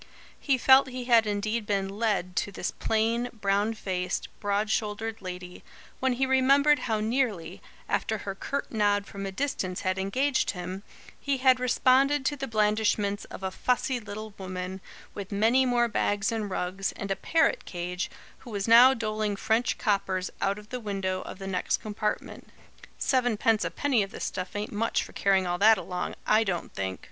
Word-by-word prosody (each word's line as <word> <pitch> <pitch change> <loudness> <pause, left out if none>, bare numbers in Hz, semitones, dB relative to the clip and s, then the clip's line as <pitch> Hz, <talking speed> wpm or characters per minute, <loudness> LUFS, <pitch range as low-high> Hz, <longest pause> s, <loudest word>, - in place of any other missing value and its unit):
He 275 -2 +1
felt 265 +2 +6
he 255 -1 -5
had 230 -3 +5
indeed 210 +2 -2
been 195 -2 0
"led" 200 -3 -1
to 205 - 0
this - - -3
plain, 230 +2 0
brown 205 0 0
faced, 180 -3 -3
broad 205 +1 0
shouldered 220 +1 -2
lady, 180 -1 -8 0.4
when 260 -1 +1
he 265 +2 +1
remembered 275 +3 +4
how 220 -1 +1
nearly, 215 -7 -1 0.3
after 220 - 0
her 200 -1 -5
curt 275 +8 -4
nod 205 -2 +2
from 195 0 -6
a - - -4
distance 190 -6 -2
had 185 0 -1
engaged 260 +9 +1
him, 180 +2 -5 0.4
he 280 -1 -1
had 255 -1 +4
responded 265 +3 +3
to 290 - +1
the 270 -1 -5
blandishments 210 -2 +1
of - - -10
a 190 - -2
fussy 250 +4 0
little 210 0 -8
woman, 185 0 -5 0.3
with 200 0 -7
many 230 +6 +3
more 240 -1 +3
bags 205 -2 0
and 220 -3 -2
rugs, 185 +1 -2
and 200 -1 -5
a - - +2
parrot 330 - +1
cage, 180 +1 -4 0.3
who 250 - -12
was 200 -2 -3
now 245 +3 +8
doling 215 -3 -2
French 220 +4 0
coppers 190 -3 0
out 195 +1 +1
of 210 0 -12
the 250 - -4
window 195 -4 -2
of - - -7
the 195 - -8
next 185 -2 0
compartment. 210 0 -4 0.5
"Seven 245 -4 +1
pence 220 0 +2
'apenny 275 -6 +1
of 195 - -2
this - - -5
stuff 185 +1 -5
ain't 205 +1 -3
much 225 +2 0
for - - -12
carrying 195 -1 +2
all 175 0 -1
that 220 +2 +7
along, 180 -1 -4
I 215 +1 +4
DON'T 180 -5 -3
think!" 95 -1 -3
210 Hz, 180 wpm, -27 LUFS, 195-240 Hz, 0.5 s, now